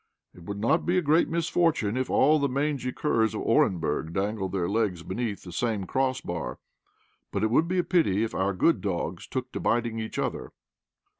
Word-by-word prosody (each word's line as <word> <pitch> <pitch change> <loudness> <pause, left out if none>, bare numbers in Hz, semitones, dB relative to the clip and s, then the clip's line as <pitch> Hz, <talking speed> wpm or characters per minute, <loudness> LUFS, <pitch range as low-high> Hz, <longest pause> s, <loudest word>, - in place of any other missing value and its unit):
It 85 - -14
would 100 +1 -5
not 115 +11 +2
be 180 +1 +1
a - - +3
great 155 +3 +3
misfortune 165 -8 +1
if 130 0 -1
all 150 +3 +4
the 140 -1 +1
mangy 140 -1 -1
curs 115 -6 +1
of - - -3
Orenburg 80 -2 +1
dangled 95 0 -1
their 90 -3 -1
legs 100 -5 0
beneath 105 +2 -3
the 90 - -9
same 105 +1 -1
cross 130 +4 0
bar, 85 -2 -4 0.7
but - - -1
it 110 - +1
would 155 +7 +3
be 185 +2 -1
a 180 - +3
pity 135 - +2
if 115 - -3
our 95 +1 0
good 165 - +3
dogs 85 -3 -3
took 130 -1 -4
to - - -4
biting 115 -1 0
each 110 0 -5
other." - - -3
115 Hz, 200 wpm, -27 LUFS, 95-140 Hz, 0.7 s, all